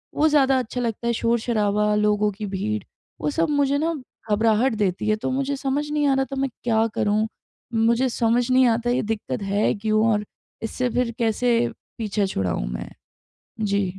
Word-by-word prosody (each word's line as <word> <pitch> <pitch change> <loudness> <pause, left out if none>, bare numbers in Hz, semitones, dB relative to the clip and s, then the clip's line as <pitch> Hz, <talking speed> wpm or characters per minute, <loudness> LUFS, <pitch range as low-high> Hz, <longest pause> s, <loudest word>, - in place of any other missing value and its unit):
वो 310 - +4
ज़्यादा 270 -3 +4
अच्छा 250 +1 -3
लगता 235 0 -2
है। 235 - +2
शोर-शराबा 215 -3 +1
लोगों 210 0 +2
की 210 +2 -6
भीड़ 205 +3 -2 0.4
वो - - 0
सब 330 +1 +1
मुझे 285 -1 +2
न 325 -3 -1 0.3
घबराहट 225 +4 +3
देती 205 -1 -1
है। 215 - +4
तो 250 - -3
मुझे 275 +1 -1
समझ 280 +2 -2
नहीं 295 -1 +1
आ 275 - +4
रहा 270 - +1
तो 275 - -4
मैं 270 0 0
क्या 225 -2 +2
करूँ। 215 +1 +1 0.5
मुझे 235 +3 +3
समझ 240 +1 +1
नहीं 255 0 +5
आता 235 +1 +1
ये 245 - +2
दिक्कत 215 -1 -5
है 200 +2 +1
क्यों 215 +1 +1
और 210 0 0 0.4
इससे 245 +3 -1
फिर 245 0 0
कैसे 235 +1 +2 0.4
पीछे 210 -2 0
छुड़ाऊँ 90 - -2
मैं। - - -6 0.7
जी। 200 -2 +1
230 Hz, 180 wpm, -23 LUFS, 210-260 Hz, 0.7 s, नहीं